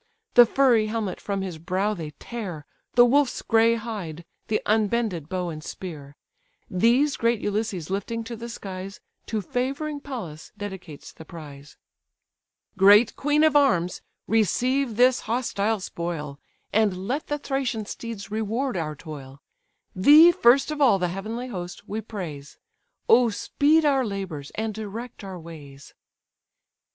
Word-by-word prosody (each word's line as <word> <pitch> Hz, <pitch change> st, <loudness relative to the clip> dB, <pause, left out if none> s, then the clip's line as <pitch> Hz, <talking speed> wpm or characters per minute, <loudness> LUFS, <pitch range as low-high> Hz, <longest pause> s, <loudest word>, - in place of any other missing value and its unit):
The 240 Hz, -1 st, +8 dB
furry 240 Hz, -4 st, +3 dB
helmet 215 Hz, -4 st, -3 dB
from 200 Hz, -1 st, -2 dB
his 180 Hz, -4 st, -6 dB
brow 190 Hz, +5 st, -1 dB
they 165 Hz, -6 st, -6 dB
tear, 190 Hz, -11 st, -6 dB, 0.3 s
The 240 Hz, 0 st, +8 dB
wolf's 270 Hz, +1 st, +2 dB
grey 230 Hz, 0 st, +4 dB
hide, 200 Hz, -8 st, -6 dB, 0.2 s
the 215 Hz, -, +1 dB
unbended 210 Hz, -6 st, 0 dB
bow 180 Hz, -2 st, -2 dB
and 155 Hz, -2 st, -7 dB
spear; 150 Hz, -7 st, -8 dB, 0.6 s
These 240 Hz, +10 st, +3 dB
great 230 Hz, -1 st, +1 dB
Ulysses 200 Hz, -5 st, -2 dB
lifting 225 Hz, +4 st, -3 dB
to 235 Hz, +1 st, -6 dB
the 235 Hz, +1 st, -7 dB
skies, 195 Hz, -3 st, -7 dB, 0.3 s
To 215 Hz, -2 st, -2 dB
favouring 275 Hz, -, -2 dB
Pallas 220 Hz, -, -8 dB
dedicates 190 Hz, -7 st, -8 dB
the -, -, -12 dB
prize: 150 Hz, -3 st, -11 dB, 1.0 s
"Great 205 Hz, +4 st, +6 dB
queen 295 Hz, +2 st, +2 dB
of 310 Hz, -2 st, +4 dB
arms, 180 Hz, -12 st, +3 dB, 0.2 s
receive 245 Hz, +3 st, +1 dB
this 250 Hz, +1 st, +5 dB
hostile 225 Hz, -3 st, 0 dB
spoil, 165 Hz, -6 st, -5 dB, 0.3 s
And 195 Hz, -3 st, +1 dB
let 280 Hz, +6 st, -2 dB
the 295 Hz, -, -1 dB
Thracian 270 Hz, -6 st, -2 dB
steeds 210 Hz, -2 st, -7 dB
reward 220 Hz, +4 st, -1 dB
our 155 Hz, -3 st, -3 dB
toil; 140 Hz, -3 st, -10 dB, 0.6 s
Thee, 300 Hz, -, +8 dB
first 275 Hz, -4 st, +4 dB
of 300 Hz, -1 st, -4 dB
all 245 Hz, -8 st, +5 dB
the 180 Hz, -2 st, -1 dB
heavenly 220 Hz, +7 st, -5 dB
host, 180 Hz, -5 st, -7 dB
we 215 Hz, +2 st, -3 dB
praise; 170 Hz, -10 st, -7 dB, 0.5 s
O 245 Hz, -1 st, +6 dB
speed 300 Hz, +8 st, +2 dB
our 275 Hz, -3 st, +3 dB
labours, 190 Hz, -, -5 dB
and 220 Hz, 0 st, -2 dB
direct 220 Hz, +3 st, -7 dB
our 190 Hz, -2 st, -7 dB
ways!" 145 Hz, -4 st, -12 dB
215 Hz, 140 wpm, -25 LUFS, 180-240 Hz, 1.0 s, The